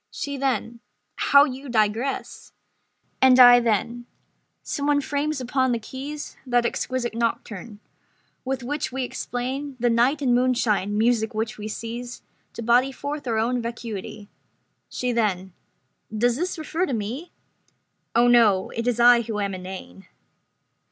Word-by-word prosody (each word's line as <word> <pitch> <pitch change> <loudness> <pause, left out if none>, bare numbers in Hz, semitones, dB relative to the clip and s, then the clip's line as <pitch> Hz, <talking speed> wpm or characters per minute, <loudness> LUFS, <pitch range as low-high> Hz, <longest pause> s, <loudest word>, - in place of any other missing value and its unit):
She 285 0 -5
then: 245 -4 -2 0.4
"How 280 0 +5
you 270 -1 -5
digress!" 225 +3 -1 0.7
And 260 -1 +6
I 245 -1 +9
then: 235 +1 -1 0.6
"Some 285 -1 -3
one 290 -1 +3
frames 285 +1 -2
upon 260 0 0
the - - +1
keys 275 +6 -7
That 245 -2 +1
exquisite 240 0 -2
nocturne, 225 -2 -3 0.6
with 265 -1 -3
which 290 +4 -3
we 265 +1 -2
explain 260 +3 -4
The 240 0 +2
night 255 +6 +2
and 250 -2 +3
moonshine; 235 -5 +1
music 225 0 +1
which 220 +1 -3
we 210 - -5
seize 235 +2 -6 0.3
To 235 - -6
body 245 +4 +3
forth 285 +1 -6
our 225 -2 0
own 240 +3 0
vacuity." 225 -3 -6 0.6
She 250 0 -2
then: 190 -6 -1 0.6
"Does 235 +2 +1
this 355 +7 -3
refer 325 +3 -2
to 270 - -3
me?" 235 - -4 0.8
"Oh 235 +1 +5
no, 225 -6 +4
it 230 +1 -4
is 240 -1 0
I 240 0 +7
who 220 -2 -4
am 200 -1 -2
inane." 185 - -9
240 Hz, 145 wpm, -24 LUFS, 225-265 Hz, 0.8 s, I